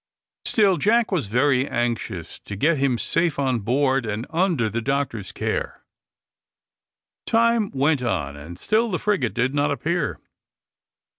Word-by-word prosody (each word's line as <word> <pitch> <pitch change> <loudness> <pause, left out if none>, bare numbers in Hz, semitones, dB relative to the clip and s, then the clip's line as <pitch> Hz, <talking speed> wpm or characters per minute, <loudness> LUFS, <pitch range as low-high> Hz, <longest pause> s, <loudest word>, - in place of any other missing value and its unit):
Still 200 -5 +3
Jack 230 +3 +2
was 165 - 0
very 130 +4 +2
anxious 115 -8 -3
to 100 - -6
get 150 +8 +2
him 135 -3 +2
safe 165 +6 0
on 130 -4 +1
board, 130 +4 +1
and 110 +1 -3
under 165 - +1
the 115 +2 -2
doctor's 135 -6 -2
care. - - -3 1.4
Time 230 -2 +3
went 140 +1 +1
on, 85 - -2
and 75 +4 -10
still 220 - +1
the 180 - -1
frigate 195 - 0
did 125 +2 +1
not 145 0 +1
appear. 155 +2 -1
135 Hz, 140 wpm, -23 LUFS, 115-170 Hz, 1.4 s, Still